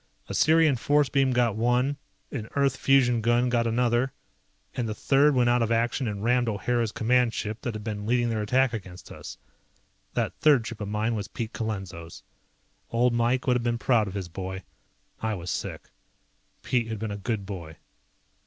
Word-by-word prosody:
A -, -, -5 dB
Sirian 160 Hz, -3 st, +4 dB
force 145 Hz, +2 st, +2 dB
beam 135 Hz, -1 st, +2 dB
got 120 Hz, -3 st, +2 dB
one, 125 Hz, +5 st, +1 dB, 0.4 s
an 115 Hz, -5 st, -5 dB
Earth 140 Hz, -2 st, +2 dB
fusion 125 Hz, -4 st, +3 dB
gun 120 Hz, +2 st, +2 dB
got 120 Hz, -1 st, +1 dB
another, 120 Hz, +2 st, +1 dB, 0.6 s
and 120 Hz, -3 st, -2 dB
the 105 Hz, -, -3 dB
third 140 Hz, +3 st, +3 dB
went 125 Hz, -1 st, +3 dB
out 120 Hz, 0 st, +3 dB
of 115 Hz, 0 st, 0 dB
action 115 Hz, +2 st, +1 dB
and 100 Hz, -1 st, -4 dB
rammed 120 Hz, 0 st, +2 dB
O'Hara's 115 Hz, +2 st, 0 dB
command 120 Hz, 0 st, +2 dB
ship 105 Hz, +2 st, -4 dB
that 120 Hz, -3 st, -4 dB
had 105 Hz, -, -6 dB
been 105 Hz, -2 st, -4 dB
leading 120 Hz, 0 st, +2 dB
their 110 Hz, -1 st, -1 dB
attack 125 Hz, +4 st, +2 dB
against 95 Hz, -5 st, -8 dB
us. -, -, -9 dB, 0.8 s
That -, -, 0 dB
third 140 Hz, -6 st, +4 dB
ship 115 Hz, -2 st, -7 dB
of 105 Hz, -, -3 dB
mine 105 Hz, +3 st, -1 dB
was 105 Hz, -3 st, -3 dB
Pete 115 Hz, -1 st, -5 dB
Colenso's. 95 Hz, -7 st, -5 dB, 0.7 s
Old 120 Hz, +1 st, +2 dB
Mike 120 Hz, +2 st, +1 dB
would 125 Hz, -, +3 dB
have 125 Hz, -, +1 dB
been 120 Hz, 0 st, 0 dB
proud 115 Hz, -3 st, +2 dB
of 95 Hz, -, -6 dB
his 95 Hz, -3 st, -4 dB
boy. 95 Hz, +2 st, -6 dB, 0.6 s
I 110 Hz, -1 st, -1 dB
was 90 Hz, -2 st, -5 dB
sick. -, -, -5 dB, 0.7 s
Pete 120 Hz, -3 st, 0 dB
had 110 Hz, -1 st, -4 dB
been 110 Hz, 0 st, -4 dB
a -, -, -3 dB
good 100 Hz, 0 st, -3 dB
boy. 85 Hz, -5 st, -7 dB
115 Hz, 190 wpm, -26 LUFS, 105-125 Hz, 0.8 s, Sirian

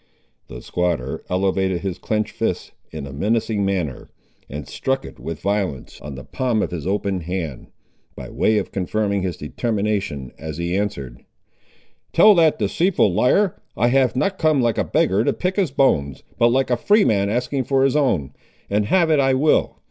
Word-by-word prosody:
The -, -, -10 dB
squatter 85 Hz, -8 st, -2 dB
elevated 95 Hz, -1 st, 0 dB
his 95 Hz, -2 st, -4 dB
clenched 110 Hz, +2 st, -1 dB
fist -, -, -3 dB, 0.2 s
in -, -, -7 dB
a 70 Hz, -, -9 dB
menacing 110 Hz, +5 st, 0 dB
manner, 90 Hz, -9 st, -2 dB, 0.4 s
and 75 Hz, 0 st, -6 dB
struck 135 Hz, 0 st, -2 dB
it -, -, -11 dB
with 80 Hz, -1 st, -6 dB
violence 100 Hz, -10 st, -2 dB
on 75 Hz, -1 st, -7 dB
the 65 Hz, -, -8 dB
palm 120 Hz, -, -1 dB
of -, -, -3 dB
his 85 Hz, -2 st, -5 dB
open 100 Hz, -1 st, -1 dB
hand, 85 Hz, -5 st, -5 dB, 0.5 s
by -, -, -8 dB
way 110 Hz, -, +2 dB
of -, -, -2 dB
confirming 100 Hz, +1 st, -1 dB
his 90 Hz, -3 st, -3 dB
determination, 100 Hz, -, -2 dB
as 80 Hz, -1 st, -6 dB
he 85 Hz, +1 st, -2 dB
answered— 70 Hz, -12 st, -3 dB, 0.9 s
"Tell 210 Hz, +5 st, +7 dB
the 165 Hz, -4 st, +5 dB
deceitful 150 Hz, -, +1 dB
liar, 180 Hz, -, +2 dB, 0.2 s
I 120 Hz, +2 st, +3 dB
have 130 Hz, -1 st, +2 dB
not 190 Hz, +9 st, 0 dB
come 155 Hz, -3 st, +3 dB
like 120 Hz, -3 st, +1 dB
a -, -, +2 dB
beggar 100 Hz, +4 st, +1 dB
to -, -, +1 dB
pick 185 Hz, +1 st, -2 dB
his 190 Hz, -6 st, +2 dB
bones, 70 Hz, -, +1 dB, 0.2 s
but 120 Hz, -, +5 dB
like 130 Hz, +2 st, +1 dB
a 120 Hz, -, +3 dB
freeman 115 Hz, -, +3 dB
asking 125 Hz, +4 st, -1 dB
for 135 Hz, +1 st, +2 dB
his 135 Hz, +1 st, +2 dB
own; 95 Hz, -, +1 dB, 0.4 s
and 105 Hz, 0 st, +1 dB
have 170 Hz, -, +3 dB
it 155 Hz, -, +4 dB
I 135 Hz, -1 st, +3 dB
will. 150 Hz, +4 st, +2 dB
105 Hz, 180 wpm, -21 LUFS, 90-130 Hz, 0.9 s, Tell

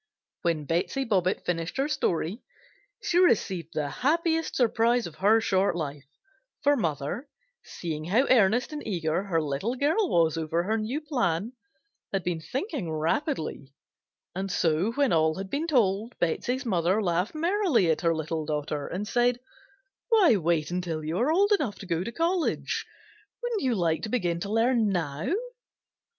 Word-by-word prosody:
When 165 Hz, -4 st, 0 dB
Betsey 175 Hz, -, -1 dB
Bobbitt 190 Hz, -5 st, 0 dB
finished 165 Hz, +2 st, -2 dB
her 270 Hz, +2 st, +1 dB
story 185 Hz, -, -1 dB, 0.6 s
she 350 Hz, -, +2 dB
received 185 Hz, -, +2 dB
the 150 Hz, -2 st, 0 dB
happiest 325 Hz, -, 0 dB
surprise 235 Hz, 0 st, +2 dB
of 170 Hz, -, -7 dB
her 215 Hz, +4 st, +4 dB
short 195 Hz, -4 st, +1 dB
life, 145 Hz, -4 st, -5 dB, 0.6 s
for 290 Hz, +1 st, +5 dB
mother, 165 Hz, -, -2 dB, 0.3 s
seeing 155 Hz, -3 st, -5 dB
how 220 Hz, +10 st, +3 dB
earnest 240 Hz, +4 st, +3 dB
and 295 Hz, -, -4 dB
eager 165 Hz, -4 st, 0 dB
her 190 Hz, -5 st, 0 dB
little 155 Hz, -, -2 dB
girl 320 Hz, -, +1 dB
was 165 Hz, -1 st, +2 dB
over 160 Hz, +2 st, 0 dB
her 220 Hz, +4 st, 0 dB
new 240 Hz, +8 st, -2 dB
plan, 235 Hz, -, -1 dB, 0.6 s
had 195 Hz, -2 st, -1 dB
been 175 Hz, 0 st, -1 dB
thinking 265 Hz, -, -4 dB
rapidly, 155 Hz, -, -2 dB, 0.6 s
and 190 Hz, +2 st, -3 dB
so 170 Hz, +6 st, +1 dB
when 280 Hz, 0 st, +2 dB
all 160 Hz, -1 st, +3 dB
had 190 Hz, 0 st, -6 dB
been 305 Hz, +4 st, -1 dB
told 225 Hz, -, +1 dB
Betsey's 250 Hz, -, -1 dB
mother 185 Hz, -1 st, +1 dB
laughed 180 Hz, -, 0 dB
merrily 335 Hz, -, +2 dB
at 160 Hz, -, -1 dB
her 165 Hz, -1 st, +2 dB
little 160 Hz, 0 st, -3 dB
daughter 150 Hz, -1 st, -3 dB
and 200 Hz, +4 st, -4 dB
said: 245 Hz, +1 st, +2 dB, 0.7 s
"Why 410 Hz, -, +6 dB
wait 170 Hz, -3 st, 0 dB
until 175 Hz, -3 st, -3 dB
you 160 Hz, +5 st, -2 dB
are 260 Hz, +6 st, +2 dB
old 400 Hz, +5 st, +3 dB
enough 285 Hz, -, +1 dB
to -, -, -9 dB
go 170 Hz, -1 st, -1 dB
to 230 Hz, -, -5 dB
college? 335 Hz, +5 st, -1 dB, 0.6 s
Wouldn't 475 Hz, -3 st, -1 dB
you 255 Hz, -3 st, +1 dB
like 165 Hz, -4 st, +1 dB
to 220 Hz, -, -4 dB
begin 175 Hz, -8 st, 0 dB
to 200 Hz, +4 st, -4 dB
learn 225 Hz, 0 st, +3 dB
now?" 160 Hz, -, -2 dB
195 Hz, 160 wpm, -27 LUFS, 165-255 Hz, 0.7 s, Why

